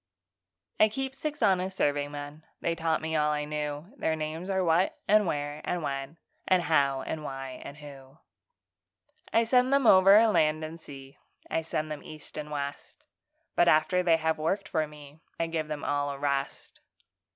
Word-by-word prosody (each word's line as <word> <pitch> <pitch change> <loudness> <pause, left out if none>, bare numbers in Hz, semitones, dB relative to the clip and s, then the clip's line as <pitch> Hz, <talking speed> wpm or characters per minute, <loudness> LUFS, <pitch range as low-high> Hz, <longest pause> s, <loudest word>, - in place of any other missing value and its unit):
_ - - -62 0.8
I 215 - +5
keep 265 +4 -4
six 300 +2 -4
honest 190 0 +2
serving 145 0 +1
men 145 +1 -8 0.2
(They 170 - 0
taught 160 -1 -1
me 160 0 -2
all 150 -1 +2
I 150 0 -1
knew); 150 - -4
Their 160 - 0
names 160 +4 -5
are 190 -1 +1
What 170 +2 +2
and 210 -2 +4
Why 145 -1 -3
and 175 -2 -2
When 140 +2 -4 0.3
And 185 -2 +3
How 140 -4 +2
and 155 -1 -4
Where 135 -2 -6
and 140 - -9
Who. 140 -1 -12 1.1
I 230 - +4
send 250 +2 +3
them 275 -2 +3
over 195 +2 +7
land 155 -7 +2
and 160 +1 -7
sea, 135 -2 -12 0.3
I 165 - +1
send 155 -1 -3
them 150 -1 -5
east 155 -1 -11
and 150 -1 -5
west; 145 -1 -6 0.5
But 175 - +4
after 180 +4 +4
they 170 -2 +4
have 160 0 -1
worked 190 +5 -1
for 160 -4 0
me, 150 0 -14 0.2
I 165 - +1
give 165 -2 -3
them 150 -1 -5
all 145 0 0
a 140 - -5
rest. 140 -1 -3
155 Hz, 185 wpm, -28 LUFS, 145-180 Hz, 1.1 s, over